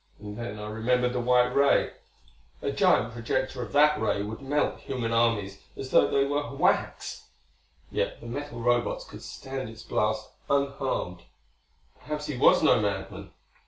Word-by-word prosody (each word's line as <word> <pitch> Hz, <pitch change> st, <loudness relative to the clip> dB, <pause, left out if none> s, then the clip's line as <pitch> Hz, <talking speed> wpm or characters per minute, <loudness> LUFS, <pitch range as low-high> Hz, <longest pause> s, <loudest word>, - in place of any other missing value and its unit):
And 105 Hz, 0 st, -8 dB
then 105 Hz, -2 st, -5 dB
I 105 Hz, 0 st, -6 dB
remembered 125 Hz, +3 st, +1 dB
the 125 Hz, -, -1 dB
white 125 Hz, 0 st, +3 dB
ray. 140 Hz, 0 st, +4 dB, 0.7 s
A -, -, -2 dB
giant 115 Hz, +1 st, +3 dB
projector 120 Hz, +3 st, -2 dB
of -, -, -6 dB
that 150 Hz, +1 st, +5 dB
ray 100 Hz, -, +1 dB
would 110 Hz, +4 st, -6 dB
melt 145 Hz, +2 st, 0 dB
human 125 Hz, -4 st, -3 dB
armies 115 Hz, -4 st, +1 dB, 0.2 s
as 135 Hz, -1 st, -6 dB
though -, -, +5 dB
they 140 Hz, 0 st, +3 dB
were 145 Hz, 0 st, -2 dB
wax; -, -, 0 dB, 0.6 s
yet -, -, -1 dB
the -, -, -12 dB
metal 120 Hz, 0 st, -5 dB
Robots 120 Hz, 0 st, +1 dB
could -, -, -11 dB
stand 135 Hz, -3 st, -6 dB
its 115 Hz, 0 st, -11 dB
blast 110 Hz, 0 st, -1 dB, 0.2 s
unharmed. 140 Hz, -10 st, -1 dB, 0.8 s
Perhaps 150 Hz, 0 st, -5 dB
he 150 Hz, -, -3 dB
was 125 Hz, -, +5 dB
no -, -, +5 dB
madman.... 95 Hz, -1 st, -3 dB
120 Hz, 160 wpm, -27 LUFS, 110-140 Hz, 0.8 s, that